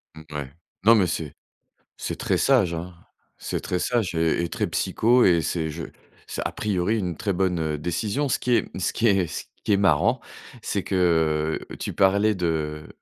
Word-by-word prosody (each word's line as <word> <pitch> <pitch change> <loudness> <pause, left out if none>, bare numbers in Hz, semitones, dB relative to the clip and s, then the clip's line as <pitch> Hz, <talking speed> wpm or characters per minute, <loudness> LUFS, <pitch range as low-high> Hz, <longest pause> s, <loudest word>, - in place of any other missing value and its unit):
Mouais. 75 -3 -7 0.3
Non, 115 +3 +7
mais 95 -4 +3
c'est 75 -4 -3 0.6
c'est - - -4
très - - 0
sage, 110 -11 +3
hein, 85 +2 -5 0.4
c'est - - -3
très 90 - -2
sage 115 -9 0
et 80 +1 +2
et 85 - -2
très - - -1
psycho 120 +2 +3
et 85 -2 +4
c'est 80 +1 -2
je 80 +2 -6 0.4
c'est, - - -4
a - - -1
priori, 105 +1 0
une 90 -4 -3
très 100 -3 -1
bonne, 90 -1 0
heu, 80 -1 -1
décision. 105 - -1
Ce 130 - +2
qui 125 - -2
est - - +2
ce 85 - -1
qui 115 - +2
est 95 -4 +3
ce - - -5 0.2
qui 105 - +2
est - - +4
marrant, 100 - +3 0.4
c'est 100 -3 -2
que 80 -4 +1 0.2
tu - - -4
parlais 100 +2 +3
de 80 -3 -2
90 Hz, 190 wpm, -24 LUFS, 80-105 Hz, 0.6 s, Non